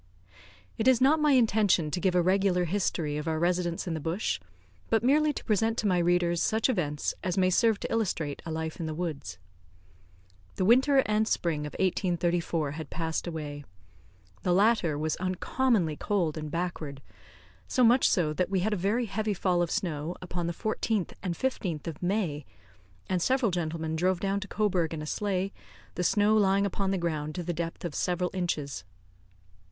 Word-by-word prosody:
It 220 Hz, -, +1 dB
is 260 Hz, -3 st, +6 dB
not 285 Hz, +5 st, +4 dB
my 300 Hz, -1 st, +4 dB
intention 210 Hz, -, +3 dB
to 180 Hz, -, -1 dB
give 180 Hz, 0 st, +1 dB
a 175 Hz, -, +4 dB
regular 185 Hz, -1 st, +2 dB
history 165 Hz, -5 st, -1 dB
of 150 Hz, +2 st, -4 dB
our 160 Hz, -1 st, 0 dB
residence 175 Hz, 0 st, 0 dB
in 175 Hz, -, -2 dB
the 160 Hz, -, -3 dB
bush, 165 Hz, +7 st, -2 dB, 0.5 s
but 225 Hz, 0 st, +2 dB
merely 300 Hz, +4 st, +4 dB
to -, -, -7 dB
present 225 Hz, +1 st, +1 dB
to -, -, -1 dB
my 180 Hz, -2 st, +2 dB
readers 175 Hz, 0 st, +2 dB
such 220 Hz, +3 st, +1 dB
events 150 Hz, -, -1 dB
as 180 Hz, 0 st, -1 dB
may 185 Hz, -1 st, +3 dB
serve 220 Hz, +2 st, +3 dB
to -, -, -4 dB
illustrate 170 Hz, -10 st, -1 dB
a -, -, -7 dB
life 160 Hz, 0 st, -4 dB
in 165 Hz, -, -3 dB
the 155 Hz, -, -4 dB
woods. 155 Hz, -, -4 dB, 1.2 s
The 185 Hz, -, 0 dB
winter 265 Hz, +5 st, +5 dB
and 215 Hz, +1 st, +1 dB
spring 155 Hz, -7 st, -1 dB
of -, -, -10 dB
1834 175 Hz, -4 st, 0 dB
had 155 Hz, 0 st, -7 dB
passed 165 Hz, 0 st, -3 dB
away. 150 Hz, -3 st, -5 dB, 0.8 s
The 180 Hz, -, +1 dB
latter 195 Hz, -7 st, +3 dB
was 155 Hz, +1 st, -1 dB
uncommonly 185 Hz, -, 0 dB
cold 180 Hz, -7 st, 0 dB
and 155 Hz, -1 st, -5 dB
backward; 155 Hz, -4 st, -4 dB, 0.6 s
so 255 Hz, -, +2 dB
much 245 Hz, +2 st, +5 dB
so 155 Hz, -5 st, +1 dB
that 180 Hz, +4 st, -1 dB
we 190 Hz, -2 st, +1 dB
had 215 Hz, +3 st, 0 dB
a -, -, 0 dB
very 210 Hz, +7 st, 0 dB
heavy 215 Hz, 0 st, -2 dB
fall 180 Hz, -1 st, +1 dB
of 175 Hz, -, 0 dB
snow 160 Hz, -1 st, -2 dB
upon 175 Hz, -1 st, -4 dB
the -, -, -1 dB
14th 215 Hz, +1 st, -2 dB
and 180 Hz, -3 st, -2 dB
15th 180 Hz, -, -2 dB
of 160 Hz, -3 st, -6 dB
May, 175 Hz, -6 st, -1 dB, 0.6 s
and 185 Hz, -2 st, 0 dB
several 255 Hz, 0 st, +2 dB
gentlemen 160 Hz, -2 st, -2 dB
drove 180 Hz, +2 st, +1 dB
down 195 Hz, +1 st, 0 dB
to 200 Hz, -, -7 dB
Cobourg 185 Hz, -7 st, 0 dB
in 155 Hz, -, -5 dB
a -, -, -5 dB
sleigh, 195 Hz, +3 st, -1 dB, 0.4 s
the 180 Hz, -, -2 dB
snow 210 Hz, +4 st, +3 dB
lying 200 Hz, -1 st, +3 dB
upon 195 Hz, 0 st, -1 dB
the 195 Hz, -, +1 dB
ground 155 Hz, -3 st, -2 dB
to 180 Hz, -, -3 dB
the 175 Hz, +1 st, -2 dB
depth 170 Hz, +1 st, -4 dB
of 170 Hz, -, -4 dB
several 180 Hz, +2 st, -1 dB
inches. 165 Hz, -6 st, -2 dB
180 Hz, 185 wpm, -28 LUFS, 160-205 Hz, 1.2 s, is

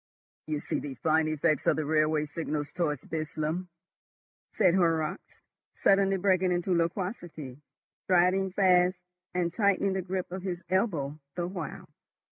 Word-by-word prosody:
"You 155 Hz, -1 st, -1 dB
see -, -, -2 dB
the 140 Hz, -2 st, -6 dB
fine 155 Hz, +4 st, +2 dB
effect 155 Hz, -1 st, +1 dB
of -, -, +5 dB
the 155 Hz, -, -2 dB
railway 155 Hz, 0 st, +2 dB
signals 150 Hz, -1 st, -4 dB
towards 150 Hz, -6 st, -1 dB
Burslem," 155 Hz, +2 st, -3 dB, 0.8 s
said 185 Hz, -5 st, +3 dB
Horrocks, 165 Hz, -4 st, 0 dB, 0.3 s
suddenly 195 Hz, -1 st, +3 dB
breaking 185 Hz, -1 st, +2 dB
into 175 Hz, +1 st, 0 dB
loquacity, 170 Hz, -, -3 dB, 0.4 s
striding 185 Hz, +1 st, +3 dB
fast, 180 Hz, -1 st, +4 dB, 0.4 s
and 175 Hz, -2 st, 0 dB
tightening 200 Hz, -2 st, +2 dB
the 190 Hz, -, -1 dB
grip 185 Hz, 0 st, -4 dB
of 185 Hz, +1 st, -4 dB
his 180 Hz, -2 st, -4 dB
elbow 160 Hz, -8 st, 0 dB, 0.2 s
the 175 Hz, -, -1 dB
while. 180 Hz, -3 st, -6 dB
175 Hz, 135 wpm, -29 LUFS, 155-185 Hz, 0.8 s, of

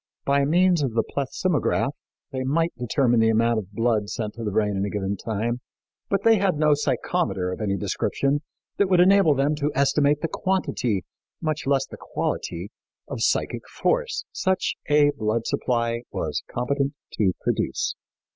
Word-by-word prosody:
By 140 Hz, 0 st, +3 dB
means 175 Hz, +2 st, +3 dB
of 130 Hz, -5 st, -1 dB
the 115 Hz, -, +3 dB
plethysmograph 140 Hz, +1 st, 0 dB, 0.4 s
they 130 Hz, -, -3 dB
might 165 Hz, +6 st, +1 dB
determine 120 Hz, 0 st, +2 dB
the 110 Hz, 0 st, +4 dB
amount 115 Hz, +1 st, +3 dB
of 100 Hz, -2 st, -9 dB
blood 110 Hz, -1 st, 0 dB
sent 105 Hz, -2 st, -3 dB
to 115 Hz, -, -7 dB
the 105 Hz, -, -1 dB
brain 105 Hz, 0 st, +1 dB
in 95 Hz, -, 0 dB
a 100 Hz, -, -1 dB
given 100 Hz, -1 st, -2 dB
time, 115 Hz, +4 st, -2 dB, 0.5 s
but 200 Hz, 0 st, 0 dB
they 225 Hz, -2 st, +5 dB
had 190 Hz, -5 st, +1 dB
no 150 Hz, 0 st, +4 dB
psychometer 145 Hz, -, 0 dB
of -, -, -7 dB
any 100 Hz, -2 st, 0 dB
description 140 Hz, +9 st, 0 dB, 0.4 s
which 200 Hz, -2 st, +3 dB
would 180 Hz, -2 st, +4 dB
enable 185 Hz, -4 st, +6 dB
them 140 Hz, +3 st, +2 dB
to 150 Hz, 0 st, 0 dB
estimate 140 Hz, +1 st, +3 dB
the 165 Hz, -, 0 dB
quantity, 140 Hz, -, -1 dB, 0.3 s
much 155 Hz, -3 st, -2 dB
less 135 Hz, -1 st, +2 dB
the -, -, -11 dB
quality, -, -, -3 dB, 0.4 s
of -, -, -5 dB
psychic -, -, 0 dB
force -, -, 0 dB
such 190 Hz, -1 st, 0 dB
a 145 Hz, 0 st, +5 dB
blood 110 Hz, -1 st, -1 dB
supply 115 Hz, -1 st, 0 dB
was -, -, -2 dB
competent 140 Hz, +3 st, -1 dB, 0.3 s
to 95 Hz, -4 st, +3 dB
produce. -, -, -1 dB
135 Hz, 165 wpm, -24 LUFS, 110-155 Hz, 0.5 s, enable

